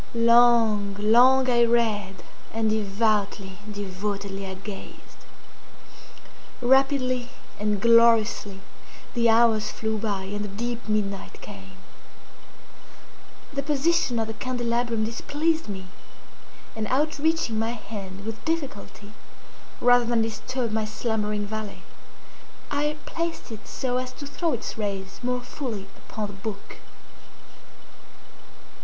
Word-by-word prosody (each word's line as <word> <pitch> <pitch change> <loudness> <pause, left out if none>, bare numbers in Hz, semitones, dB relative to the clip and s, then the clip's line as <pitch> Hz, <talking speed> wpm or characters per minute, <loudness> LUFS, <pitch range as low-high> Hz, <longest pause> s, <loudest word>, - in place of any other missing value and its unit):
Long, 230 -3 +5
long 250 +5 +6
I 240 -1 +4
read—and 220 -1 0
devoutly, 205 -2 0
devotedly 200 0 -4
I 190 - -5
gazed. 195 +1 -10 1.3
Rapidly 255 -1 +3 0.3
and 210 -1 0
gloriously 230 -3 +4 0.5
the 235 -2 +3
hours 225 -2 +4
flew 220 0 -2
by 200 -3 -2
and 205 +2 -4
the - - -3
deep 235 +4 -4
midnight 200 -2 -2
came. - - -11 1.8
The 280 - -1
position 290 -2 +1
of 225 - +1
the 225 - -5
candelabrum 235 -1 -1
displeased 300 +5 -1
me, 190 -2 -5 0.9
and 220 -1 -2
outreaching 300 -3 +1
my 225 +1 0
hand 200 -3 -8
with 225 0 -6
difficulty, 260 -9 -4 0.7
rather 245 0 +5
than 230 -1 +2
disturb 235 +2 -3
my 220 0 0
slumbering 210 -1 -1
valet, 215 0 -6 0.9
I 295 +1 0
placed 335 -6 -4
it 220 - -9
so 250 -2 -1
as 255 0 -3
to 285 - -8
throw 320 +3 -1
its 230 -1 -4
rays 195 -2 -3
more 250 0 -1
fully 245 -5 -5 0.2
upon 215 - -3
the 205 - -7
book. 200 +1 -7
225 Hz, 110 wpm, -26 LUFS, 205-245 Hz, 1.8 s, long